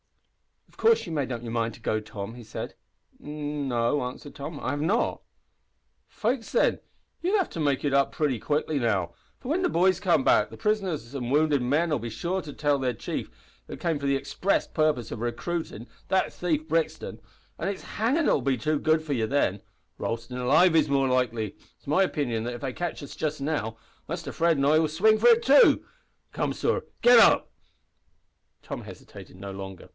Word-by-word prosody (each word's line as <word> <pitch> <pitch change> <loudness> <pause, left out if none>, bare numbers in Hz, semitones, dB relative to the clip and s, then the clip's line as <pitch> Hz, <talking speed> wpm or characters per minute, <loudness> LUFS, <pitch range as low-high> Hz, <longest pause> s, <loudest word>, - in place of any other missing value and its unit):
"Of - - -26
course 455 0 +3
you've 165 - -6
made 140 -4 -1
up 120 -1 -4
your 115 - -5
mind 115 -1 -1
to - - -15
go, 110 -1 -1
Tom?" 105 0 -7
he 120 0 -10
said. 110 - -6 0.5
"N 150 -1 -4
no," 120 +3 +1
answered 125 +3 -7
Tom. 145 +1 -7
"I 130 - -2
have 145 0 -2
not." 195 +10 0 0.9
"Faix, 230 +1 -2
thin, - - +2 0.4
you'll 375 +5 +2
have 380 - -1
to - - -6
make 145 -2 0
it 140 - +1
up 140 0 +3
pritty 145 -7 0
quick 145 +7 -1
now, 115 - 0 0.2
for 255 - -9
whin 355 +4 +1
the 370 - +2
boys 185 +1 +3
come 175 -8 +2
back - - +4
the - - -11
prisoners 190 - -1
an 125 -4 -4
wounded 145 0 +3
men'll 150 +4 +1
be 115 +1 -5
sure 175 - -2
to 150 - -8
tell 145 -2 +1
that - - -4
their 125 - +1
chief - - -4 0.5
came 165 -4 -1
for 140 - -2
the 140 - +3
express 185 +8 0
purpose 155 -8 0
of 115 - -5
rescuin' 120 +1 -4 0.2
that 190 0 +2
`thief 160 -3 -2
Brixton' 165 0 -1 0.4
an' 170 - -2
it's 200 -1 -4
hangin' 265 +9 0
that'll - - +3
be 135 -2 +1
too 150 +6 0
good 155 +1 +2
for 150 -2 -2
you 115 -4 0
then. 105 -7 +1 0.4
Roastin' 115 +2 -4
alive 155 +8 +4
is 155 -2 +4
more 135 -1 +2
likely. 120 -5 0 0.2
It's - - -32
my 150 +7 +2
opinion 135 -11 0
that 120 0 -3
if - - -9
they 135 -3 -3
catch 175 -1 -4
us 140 - -9
just 155 -1 -2
now, 135 -7 -2 0.3
Muster 170 +1 -5
Fred 165 -2 +2
an' 140 - +1
I 155 +2 +5
will 160 - +2
swing 215 +8 +3
for 235 - +4
it 235 -1 +6
too! 280 +2 +6 0.5
Come, - - -1
sor, 480 - -1 0.2
git 240 0 +8
up!" - - +5 1.1
Tom - - -6
hesitated - - -12
no 100 +1 -7
longer. 95 -1 -8
145 Hz, 200 wpm, -26 LUFS, 120-170 Hz, 1.1 s, git